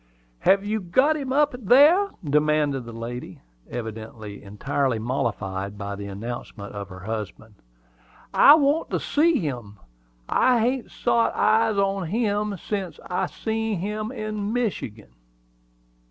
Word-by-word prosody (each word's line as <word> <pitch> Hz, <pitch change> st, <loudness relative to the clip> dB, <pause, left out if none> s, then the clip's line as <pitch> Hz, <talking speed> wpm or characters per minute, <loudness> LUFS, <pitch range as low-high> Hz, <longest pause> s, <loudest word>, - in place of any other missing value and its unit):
"Hev 195 Hz, -, +3 dB
you 215 Hz, +1 st, 0 dB
got 260 Hz, -, +3 dB
him 275 Hz, -3 st, -4 dB
in 275 Hz, -4 st, +1 dB
there?" 305 Hz, -, +6 dB
demanded 150 Hz, -3 st, +1 dB
the 115 Hz, -, -8 dB
lady, 115 Hz, +2 st, -7 dB, 0.3 s
evidently 110 Hz, -2 st, -7 dB
entirely 130 Hz, +5 st, -1 dB
mollified 105 Hz, -4 st, -3 dB
by 100 Hz, 0 st, -4 dB
the 100 Hz, 0 st, -7 dB
announcement 100 Hz, 0 st, -7 dB
of 100 Hz, -1 st, -6 dB
her 90 Hz, -1 st, -10 dB
husband. 110 Hz, +1 st, -6 dB, 0.8 s
"I 290 Hz, -, +9 dB
want 295 Hz, +1 st, +2 dB
to -, -, -1 dB
see 320 Hz, +1 st, +2 dB
him. 120 Hz, -, -4 dB, 0.5 s
I 250 Hz, -2 st, +3 dB
hain't 245 Hz, +2 st, 0 dB
sot 230 Hz, -, +1 dB
eyes 220 Hz, 0 st, +3 dB
on 195 Hz, -2 st, 0 dB
him 210 Hz, 0 st, 0 dB
sence 195 Hz, 0 st, -4 dB
I 180 Hz, -, 0 dB
see 220 Hz, -1 st, -2 dB
him 210 Hz, +4 st, -3 dB
in 215 Hz, -4 st, -3 dB
Michigan." 190 Hz, -, -3 dB
180 Hz, 130 wpm, -24 LUFS, -, 0.8 s, I